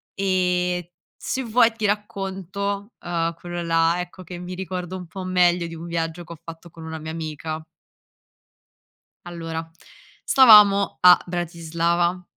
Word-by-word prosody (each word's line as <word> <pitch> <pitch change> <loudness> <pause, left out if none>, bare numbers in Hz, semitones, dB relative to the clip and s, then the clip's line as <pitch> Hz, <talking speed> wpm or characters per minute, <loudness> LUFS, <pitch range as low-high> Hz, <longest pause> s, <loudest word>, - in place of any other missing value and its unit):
E 180 -2 0 0.2
se 265 - -3
vuoi 230 0 +4
ti 220 -2 -3
racconto, 200 0 -3
uhm, 170 -1 -1
quello 175 0 -6
là, 165 +1 +2
ecco, 180 +1 -9
che 175 +1 -9
mi 180 +1 -7
ricordo 185 -1 -5
un 180 - -8
po' 190 +3 -7
meglio, 180 -2 +2
di 165 - -8
un 165 +1 -8
viaggio 170 0 -3
che 170 - -10
ho 165 - -14
fatto 165 +1 -11
con 165 -1 -11
una 160 0 -6
mia 155 +1 -6
amica. 155 0 -5 1.6
Allora 165 -1 -6 0.5
stavamo 210 -6 +6
a 180 0 +8
Bratislava 170 +1 -1
175 Hz, 140 wpm, -23 LUFS, 165-190 Hz, 1.6 s, a